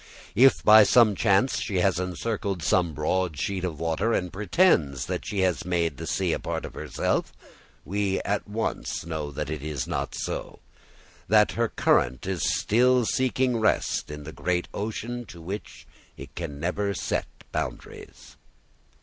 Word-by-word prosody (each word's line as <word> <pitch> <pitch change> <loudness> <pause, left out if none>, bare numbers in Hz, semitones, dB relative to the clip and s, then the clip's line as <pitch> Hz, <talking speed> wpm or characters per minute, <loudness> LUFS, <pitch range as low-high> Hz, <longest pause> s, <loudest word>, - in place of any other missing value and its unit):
If, 130 +5 +5
by 110 +1 +9
some 110 +1 +5
chance, 100 +5 +2
she 100 - -3
has 90 0 +2
encircled 95 0 -3
some 85 0 +2
broad 80 0 -1
sheet 95 -2 -2
of 85 -5 -3
water 85 +8 0
and 90 -4 -1
pretends 90 - +2
that - - -4
she 100 -2 -1
has 90 -4 +1
made 85 -5 -1
the - - -6
sea - - 0
a - - -2
part - - -4
of - - -9
herself, - - -2 0.5
we 100 +1 0
at 100 +1 -2
once 110 -5 -3
know 80 -3 -4
that 75 +1 -4
it 80 -3 -4
is 75 -3 -3
not - - -3
so, - - -4 0.7
that 105 +1 +5
her 115 0 0
current 65 - +1
is 95 -4 -2 0.2
still 125 +2 +3
seeking 130 0 +1
rest 110 - +1
in 75 0 -7
the 80 - -8
great 90 -1 -1
ocean 115 +3 -4
to 85 -4 -12
which 95 +6 -7 0.3
it - - -10
can 75 -5 -6
never 100 +5 -1
set - - -2 0.2
boundaries. - - -6
95 Hz, 160 wpm, -26 LUFS, 80-110 Hz, 0.7 s, by